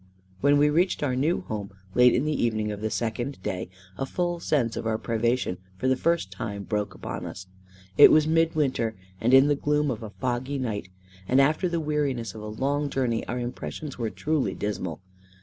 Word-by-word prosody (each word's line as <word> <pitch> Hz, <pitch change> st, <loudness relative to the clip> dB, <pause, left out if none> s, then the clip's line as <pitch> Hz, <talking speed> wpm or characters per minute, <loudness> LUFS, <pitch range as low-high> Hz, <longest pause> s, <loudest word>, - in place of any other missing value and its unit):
When 145 Hz, +1 st, +4 dB
we 150 Hz, +1 st, +4 dB
reached 175 Hz, +1 st, +2 dB
our 130 Hz, -3 st, +1 dB
new 155 Hz, +9 st, +1 dB
home, 105 Hz, -, -5 dB, 0.2 s
late 125 Hz, +1 st, +6 dB
in 125 Hz, -, +1 dB
the 150 Hz, -4 st, 0 dB
evening 110 Hz, -2 st, 0 dB
of 105 Hz, -1 st, -6 dB
the 110 Hz, -, -1 dB
second 120 Hz, +5 st, -2 dB
day, 90 Hz, -1 st, -3 dB, 0.3 s
a 135 Hz, -, -1 dB
full 175 Hz, +1 st, -1 dB
sense 130 Hz, -8 st, 0 dB
of -, -, -3 dB
our 110 Hz, -1 st, +1 dB
privation 115 Hz, -4 st, 0 dB, 0.2 s
for 115 Hz, -, -1 dB
the 130 Hz, -, +4 dB
first 165 Hz, -, 0 dB
time 100 Hz, +1 st, -5 dB
broke 105 Hz, -2 st, -2 dB
upon -, -, -6 dB
us. 95 Hz, -, -8 dB, 0.5 s
It -, -, +11 dB
was 155 Hz, -1 st, +5 dB
mid 165 Hz, +1 st, +2 dB
winter, 130 Hz, -7 st, 0 dB, 0.2 s
and 120 Hz, -, +1 dB
in 135 Hz, +1 st, +8 dB
the 145 Hz, -, +3 dB
gloom 150 Hz, 0 st, +1 dB
of 115 Hz, -, -4 dB
a 110 Hz, -, -6 dB
foggy 130 Hz, +4 st, -2 dB
night, 105 Hz, -8 st, -3 dB, 0.4 s
and 130 Hz, -, +4 dB
after 155 Hz, +6 st, +3 dB
the 170 Hz, -1 st, -1 dB
weariness 140 Hz, -8 st, -1 dB
of 110 Hz, -, -9 dB
a 105 Hz, -, -6 dB
long 140 Hz, +6 st, -1 dB
journey, 125 Hz, -4 st, 0 dB
our 125 Hz, -, -3 dB
impressions 125 Hz, +3 st, -5 dB
were 115 Hz, -2 st, -1 dB
truly 155 Hz, +4 st, -1 dB
dismal. 95 Hz, -5 st, -3 dB
125 Hz, 200 wpm, -26 LUFS, 110-150 Hz, 0.5 s, It